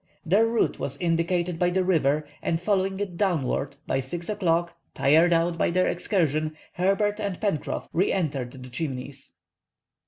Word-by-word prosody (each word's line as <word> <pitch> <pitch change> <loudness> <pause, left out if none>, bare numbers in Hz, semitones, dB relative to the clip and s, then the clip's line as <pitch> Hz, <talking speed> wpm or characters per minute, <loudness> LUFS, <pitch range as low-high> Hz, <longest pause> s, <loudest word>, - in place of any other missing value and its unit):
Their 200 +7 +4
route 230 0 +1
was 140 0 -3
indicated 170 +1 0
by 175 - +3
the 185 +1 +1
river, 150 -5 +2
and 165 - 0
following 190 0 0
it 190 -4 -4
downward, 145 -7 0
by 135 - 0
6 170 +8 -5
o'clock, 170 -4 +1 0.2
tired 160 +5 +4
out 165 0 +2
by - - +3
their 185 +2 +2
excursion, 155 -5 0 0.2
Herbert 200 +3 +1
and 200 -4 -3
Pencroff 200 -9 -2
re 180 +4 +2
entered 140 -9 -2
the 125 - -10
Chimneys. 135 -1 -5
170 Hz, 155 wpm, -26 LUFS, 155-190 Hz, 0.2 s, Their